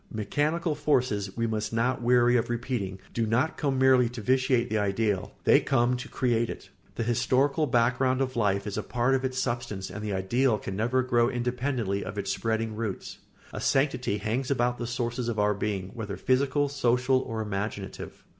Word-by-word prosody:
] - - -32
Mechanical 150 - -1
forces, 125 -10 0
we 115 - +1
must 110 -1 -2
not 120 +3 0
weary 120 0 +4
of 120 - +1
repeating, 115 -5 -3
do 115 -1 0
not 125 +8 +1
come 140 -3 -1
merely 130 -2 +5
to 120 -1 -7
vitiate 130 +1 +2
the 110 0 0
ideal; 100 -1 -1
they - - +6
come 125 -1 +2
to 125 - -8
create 120 -2 0
it. - - -8 0.2
The - - -1
historical 135 +6 +1
background 125 +2 +2
of 130 -1 -1
life 100 -3 +1
is 105 0 -3
a - - -1
part 120 +6 0
of 135 0 +1
its 130 -1 -2
substance 120 -7 -3
and 105 +3 -6
the 105 - -3
ideal 110 +6 +1
can 95 -1 -6
never 120 +5 +1
grow 120 -1 +2
independently 120 -4 -1
of 95 +2 -7
its 100 -1 -2
spreading 110 0 -2
roots. 110 -4 -5 0.3
A - - -5
sanctity 130 -6 +1
hangs 115 +5 -2
about 125 -2 +1
the 120 - -3
sources 120 0 -2
of 115 - -3
our 105 0 +3
being, 100 -2 -3
whether 105 -4 -5
physical, 140 +2 +1
social, 130 -1 +2
or 115 -3 -4
imaginative. 105 -1 -5
120 Hz, 190 wpm, -27 LUFS, 105-130 Hz, 0.3 s, they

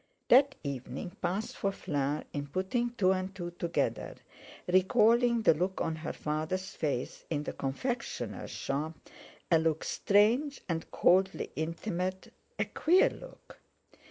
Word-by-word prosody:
That 275 +2 +6
evening 135 +3 -5
passed 190 +5 -2
for 195 - 0
Fleur 145 -5 -2
in 145 0 -3
putting 190 - -1
two 190 -5 +3
and 190 0 -2
two 175 -2 -5
together; 170 0 -2 0.5
recalling 230 +5 +4
the - - +6
look 180 +5 -2
on 160 - -1
her 160 - -4
father's 160 +6 -3
face 140 -8 -3
in 150 -2 -1
the - - -4
confectioner's 235 - -3
shop—a 155 +3 -3
look 160 -1 0
strange 235 +8 +2
and 165 -2 -3
coldly 190 +2 +2
intimate, 180 +3 -3 0.2
a - - +1
queer 355 +4 +3
look. - - -13
185 Hz, 130 wpm, -31 LUFS, 155-210 Hz, 0.5 s, That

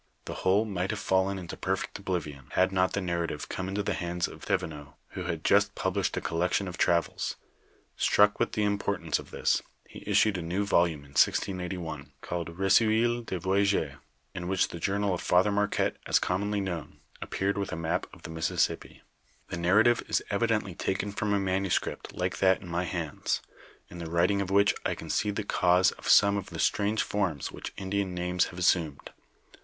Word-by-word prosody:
The - - -5
whole 100 +4 +3
might 95 -3 -2
have 105 - -2
fallen 95 0 +1
into 90 -3 -6
perfect 95 +1 -3
oblivion, 80 -9 -4
had 95 +1 +3
not 95 -1 +2
the 100 - 0
narrative 85 -2 -3
come 95 - -3
into 100 +2 -2
the - - -1
hands 85 0 -2
of - - -12
Thevenot 75 -2 -3
who - - -6
had - - -3
just - - +3
published - - -1
a - - -1
collection 90 +3 0
of 90 - -5
travels; 85 0 +1 0.6
struck 105 0 +4
with - - 0
the 105 - 0
im 100 -1 +1
portance 85 -6 -1
of - - -11
this, - - +1 0.3
he - - -11
issued 105 -4 +3
a - - -4
new 90 +5 -1
volume 85 -6 +2
in 70 -1 -16
1681, 90 -2 0
called 85 -1 -5
Re 95 0 0
ceuil 115 +3 +4
de 95 - -3
Voyages, 95 -5 +1 0.4
in 90 0 -5
which 95 0 +1
the 85 - -7
journal 100 +2 0
of 90 - -3
Father 95 +4 +3
Marquette 105 0 0
as - - +4
commonly 100 +2 0
known, 90 -5 -5 0.2
appeared 100 +1 -1
with 100 - -3
a - - -2
map 85 +2 -2
of 85 - -16
the 80 - -7
Mississippi. 80 0 -1 0.5
The - - -4
narrative 105 +8 +4
is - - +1
evidently - - 0
taken 100 +2 -2
from 105 +1 -2
a 100 - +3
manuscript 95 -1 -1
like 90 -1 -2
that 95 0 +4
in - - -9
my 85 +1 -1
hands, 80 -4 -2 0.4
in 90 - -10
the 85 -1 -5
writing 90 +4 +2
of 95 - -3
which 100 +1 +4
I - - 0
can - - -6
see 105 - +1
the 105 +1 -2
cause 90 -2 +3
of - - -7
some 100 0 +6
of 100 0 -5
the - - -7
strange 105 +1 +1
forms 95 -9 -2
which - - -7
Indian 95 -1 -2
names 90 0 +1
have 90 - -9
assumed. 85 -5 +1
95 Hz, 195 wpm, -28 LUFS, 85-100 Hz, 0.6 s, some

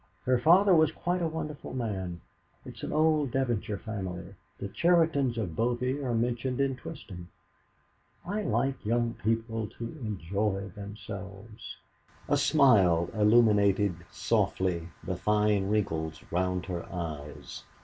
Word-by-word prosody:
"Her 125 -1 +3
father 185 +8 +6
was 160 -2 +5
quite 175 +2 -2
a 170 - +1
wonderful 150 -4 -5
man. 95 -8 -3 0.4
It's - - -10
an - - -4
old 155 -2 +3
Devonshire 120 -5 -1
family. 95 -4 -6 0.2
The - - -4
Cheritons 160 - +2
of 95 -8 -3
Bovey 125 +4 0
are 125 -4 -1
mentioned 120 +2 -1
in 135 -1 +1
Twisdom. 90 -8 -9 1.0
I 205 +4 -2
like 135 -9 -1
young 115 +1 +1
people 115 0 -1
to - - -6 0.2
enjoy 100 0 -2
themselves." 100 0 -8 0.5
A - - +3
smile 95 - +4
illumined 105 -3 +4 0.2
softly 90 -3 0 0.2
the 90 +1 -3
fine 105 -1 +2
wrinkles 80 -7 -1
round 90 +1 0
her 90 -3 -4
eyes. 75 -5 -6
110 Hz, 125 wpm, -29 LUFS, 95-130 Hz, 1.0 s, father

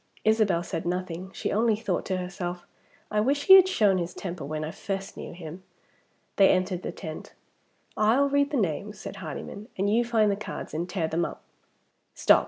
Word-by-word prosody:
Isabel 215 -6 +3
said 165 - -4
nothing; 180 0 -3
she - - -3
only 220 +1 +3
thought 205 -4 -2
to 185 - 0
herself, 180 -1 -5 0.5
"I 210 - +2
wish 280 +6 +1
he 380 - +9
had 380 -1 +9
shown 205 - +3
his 175 0 -4
temper 175 -5 -5
when 155 +2 -3
I 155 - -4
first 195 +1 -5
knew - - -7
him!" 170 +1 -9 0.8
They 195 - +7
entered 185 -1 +1
the - - -4
tent. 160 -4 -8 0.6
"I'll 235 +7 +4
read 285 0 +2
the 295 - -1
names," 200 +1 -2
said - - -7
Hardyman, 210 +2 -7
"and 195 +2 +1
you 235 +3 +4
find 225 -3 +3
the - - +1
cards 210 - -7
and 170 +3 -3
tear 175 -3 -1
them 165 +2 0
up. - - -5 0.7
Stop! - - +6
195 Hz, 190 wpm, -27 LUFS, 175-220 Hz, 0.8 s, he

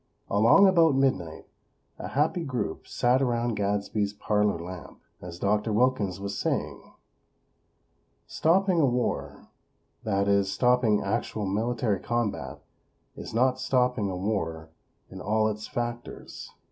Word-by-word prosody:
Along 115 - +6
about 165 -6 +4
midnight 130 -13 0 0.5
a - - -5
happy 155 +5 0
group 125 - -4
sat 125 +2 +1
around 120 -2 0
Gadsby's 100 0 -1
parlor 105 -1 0
lamp, 90 +1 -9 0.2
as 85 -1 -8
Dr. 105 +4 0
Wilkins 105 -5 +1
was 100 0 -4
saying; - - -2 1.4
"Stopping 180 +1 +2
a - - +4
war; 125 0 -3 0.5
that 100 -2 0
is, 100 -1 +2
stopping 125 0 +2
actual 105 +1 -2
military 110 +1 -1
combat, 105 - -3 0.5
is - - -8
not 130 +3 +2
stopping 125 -5 +1
a 90 - -4
war 80 -5 -3 0.4
in 95 - -8
all 110 +2 +1
its 105 0 -4
factors. 120 0 -6
110 Hz, 120 wpm, -27 LUFS, 100-125 Hz, 1.4 s, Along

